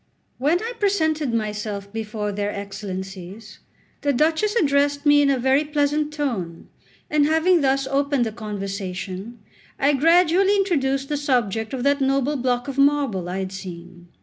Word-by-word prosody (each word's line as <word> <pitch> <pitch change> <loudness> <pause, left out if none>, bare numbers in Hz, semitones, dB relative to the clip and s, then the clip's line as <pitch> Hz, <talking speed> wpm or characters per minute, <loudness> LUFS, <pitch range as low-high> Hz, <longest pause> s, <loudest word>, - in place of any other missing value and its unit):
When 300 +7 +2
I 470 +2 -4
presented 315 - +1
myself 210 -2 -3
before 215 -1 -3
their 205 0 -2
Excellencies, 195 0 -7 0.4
the 285 - +1
Duchess 320 - +1
addressed 285 -5 +2
me 290 0 +6
in 285 - +3
a 275 - +2
very 265 +4 +2
pleasant 295 0 0
tone; 230 - -4 0.4
and 295 -1 +2
having 320 +2 +3
thus 275 0 +1
opened 280 -1 +1
the 220 - -3
conversation, 195 0 -5 0.4
I 285 +2 +3
gradually 350 +6 +4
introduced 275 -9 0
the 295 - -1
subject 230 -6 0
of 255 -2 -3
that 280 0 +2
noble 275 +2 +1
block 245 -1 -1
of 275 0 -4
marble 275 -11 +2
I 185 - -3
had 190 -1 -3
seen. 175 -2 -9
270 Hz, 150 wpm, -22 LUFS, 205-295 Hz, 0.4 s, me